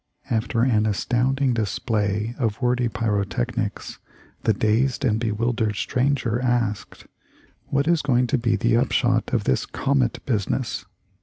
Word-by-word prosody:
After 115 +1 +1
an 110 -4 +2
astounding 125 +5 +1
display 105 0 -1
of 115 -2 -1
wordy 125 -1 +1
pyrotechnics 105 - -2 0.5
the - - +4
dazed 115 +6 +1
and 110 -3 +2
bewildered 115 -1 -1
stranger 125 -1 0
asked: 120 -5 -1 0.6
'What 140 +1 0
is 170 -2 +3
going 125 -3 +2
to - - +5
be 115 -1 +1
the 115 +3 +2
up 125 +2 +1
shot 120 -2 +1
of 120 -4 +1
this 65 -9 +1
comet 135 -4 0
business?' 115 +1 -1
120 Hz, 135 wpm, -23 LUFS, 110-125 Hz, 0.6 s, to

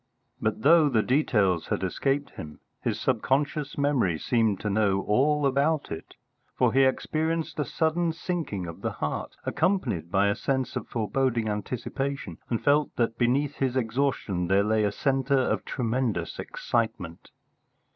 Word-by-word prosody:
But 110 0 -1
though 155 +1 +6
the 110 -5 +2
details 105 - +2
had - - -2
escaped 135 +9 -1
him, 75 -1 -9 0.2
his 110 -2 -1
subconscious 135 +4 0
memory 135 - +1
seemed 110 -1 +1
to 105 - -2
know 100 -2 +2
all 145 +7 +2
about 140 +3 +1
it, 80 0 -7 0.4
for - - +3
he 135 - +5
experienced 160 +5 -1
a 150 - +1
sudden 165 +5 0
sinking 160 - -3
of 85 -1 -8
the - - -2
heart, 75 - -4
accompanied 135 - 0
by 100 +2 +3
a 100 - +1
sense 130 -2 -2
of - - -4
foreboding 120 0 0
anticipation, 120 - -3
and 115 - -1
felt 145 +1 +2
that 115 -1 -1
beneath 135 +4 +1
his 130 -1 0
exhaustion 115 -7 -1
there 95 +2 +3
lay 110 +1 +2
a 100 - +1
centre 135 +3 +1
of 130 - +1
tremendous 125 -2 -2
excitement. 110 -8 -3
125 Hz, 150 wpm, -27 LUFS, 105-145 Hz, 0.4 s, though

